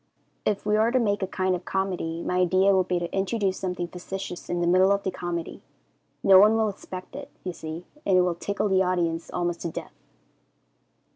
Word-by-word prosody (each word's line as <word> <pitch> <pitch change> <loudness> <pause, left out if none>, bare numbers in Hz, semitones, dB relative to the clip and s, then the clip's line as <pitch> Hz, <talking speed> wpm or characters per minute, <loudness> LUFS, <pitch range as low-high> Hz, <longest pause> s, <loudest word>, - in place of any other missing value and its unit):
If 205 -1 0
we 210 0 +2
are 220 +2 +3
to 255 - +2
make 205 -4 +1
a 190 - 0
kind 185 0 0
of 180 - -6
comedy, 180 -4 -2
my 180 - -1
idea 185 +2 +4
would 185 -1 +2
be 180 - +1
to 175 +1 -4
introduce 195 0 0
something 180 -2 -3
facetious 180 +1 -7
in 175 - -1
the 175 - +1
middle 185 +3 +5
of 200 0 +1
the 190 - -1
comedy. 175 -2 -5 0.6
No 190 -1 +8
one 210 +3 +6
will 220 -1 +2
expect 185 -2 -9
it, - - -7
you 180 - -4
see, 160 +2 -7 0.2
and 190 -2 +3
it - - +6
will 180 -1 +1
tickle 200 +5 -2
the 190 -1 +3
audience 170 -3 0
almost 175 -1 -2
to 170 - -2
death. - - -7
185 Hz, 210 wpm, -26 LUFS, 175-195 Hz, 0.6 s, No